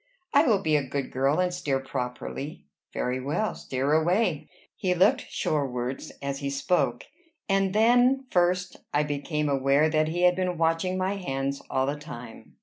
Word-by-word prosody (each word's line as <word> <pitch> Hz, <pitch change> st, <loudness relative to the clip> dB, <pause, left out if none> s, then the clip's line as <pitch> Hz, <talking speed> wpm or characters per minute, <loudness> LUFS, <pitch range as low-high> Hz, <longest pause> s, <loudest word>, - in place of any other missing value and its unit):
"I 285 Hz, +2 st, +5 dB
will 205 Hz, -5 st, +3 dB
be 155 Hz, -1 st, +2 dB
a 150 Hz, -, +3 dB
good 135 Hz, 0 st, -4 dB
girl, 135 Hz, +5 st, +1 dB
and 180 Hz, -1 st, +1 dB
steer 140 Hz, -6 st, -1 dB
properly." 135 Hz, -, -5 dB, 0.3 s
"Very 125 Hz, +1 st, -2 dB
well; 150 Hz, +11 st, -1 dB
steer 135 Hz, +3 st, -2 dB
away." 165 Hz, +1 st, +1 dB, 0.3 s
He 185 Hz, -4 st, 0 dB
looked 205 Hz, +9 st, +3 dB
shorewards 130 Hz, -3 st, -2 dB
as 140 Hz, 0 st, -3 dB
he 140 Hz, -1 st, -3 dB
spoke; 140 Hz, -3 st, 0 dB, 0.4 s
and 195 Hz, -1 st, +2 dB
then 245 Hz, +4 st, +4 dB
first 180 Hz, +1 st, +1 dB, 0.2 s
I 150 Hz, -, +4 dB
became 150 Hz, +1 st, -2 dB
aware 140 Hz, +2 st, +3 dB
that 155 Hz, 0 st, +2 dB
he 175 Hz, +3 st, -1 dB
had 180 Hz, 0 st, +5 dB
been 180 Hz, -1 st, -1 dB
watching 165 Hz, +3 st, +1 dB
my 190 Hz, +2 st, -1 dB
hands 140 Hz, -6 st, -3 dB
all 130 Hz, 0 st, +1 dB
the 140 Hz, +2 st, -2 dB
time. 125 Hz, -7 st, -10 dB
155 Hz, 165 wpm, -27 LUFS, 135-185 Hz, 0.4 s, I